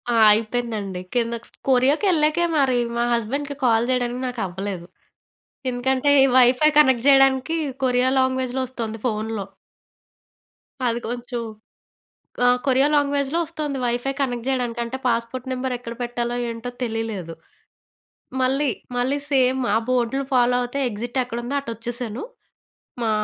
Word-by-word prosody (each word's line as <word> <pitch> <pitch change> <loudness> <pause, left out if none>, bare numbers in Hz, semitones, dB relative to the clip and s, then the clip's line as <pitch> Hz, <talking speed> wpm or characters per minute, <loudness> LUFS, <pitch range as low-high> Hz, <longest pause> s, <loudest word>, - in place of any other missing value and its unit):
ఆ! - - +3 0.2
అయిపేందండి. 215 -4 -2
కింద 235 -1 0
క్స్ - - -14 0.2
కొరియాకెళ్ళాకే 305 +5 +3
మరి 270 -3 +3 0.2
మా 235 - +2
హస్బండ్‌కి 275 +5 -2
కాల్ 230 0 +3
చేయడానికి 250 -1 0
నాకు 250 -2 -4
అవ్వలేదు. 190 -1 -5 0.9
ఎందుకంటే 260 +3 +1 0.3
వైఫై 255 +4 +6
కనెక్ట్ 260 -5 +4
జేయడానికి 270 +2 +4 0.3
కొరియా 250 0 +3
లాంగ్వేజ్‌లో 260 0 0
వస్తుంది 230 -3 -5
ఫోన్‌లో. 215 -2 -2 1.4
అది 235 0 0
కొంచెం 240 0 -4 1.0
ఆ! - - +6 0.2
కొరియా 270 +1 +4
లాంగ్వేజ్‌లో 285 +1 +1
వస్తుంది 305 -3 -4
వైఫై 245 +2 0
కనెక్ట్ 245 -4 -1
జేయడానికి 245 -3 -1
అంటే, 235 +3 -5
పాస్‌పోర్ట్ 235 +2 -2
నంబర్ 255 0 -2
ఎక్కడ 235 -1 -7
పెట్టాలో 240 0 -2
ఏంటో 230 +1 -5
తెలీలేదు. 220 -7 -3 1.1
మళ్ళీ 270 +3 +2 0.3
మళ్ళీ 260 +3 +1
సేమ్ 260 -1 +3
ఆ - - +3
బోర్డ్‌లు 255 +2 +1
ఫాలో 245 -1 +4
అవుతే 245 +3 -3
ఎగ్జిట్ 240 +4 -3
ఎక్కడుందో 240 +3 -3
అటు 275 -4 -6
వచ్చేశాను. 240 +1 -5 0.8
మా 225 - +1
245 Hz, 125 wpm, -22 LUFS, 235-265 Hz, 1.4 s, వైఫై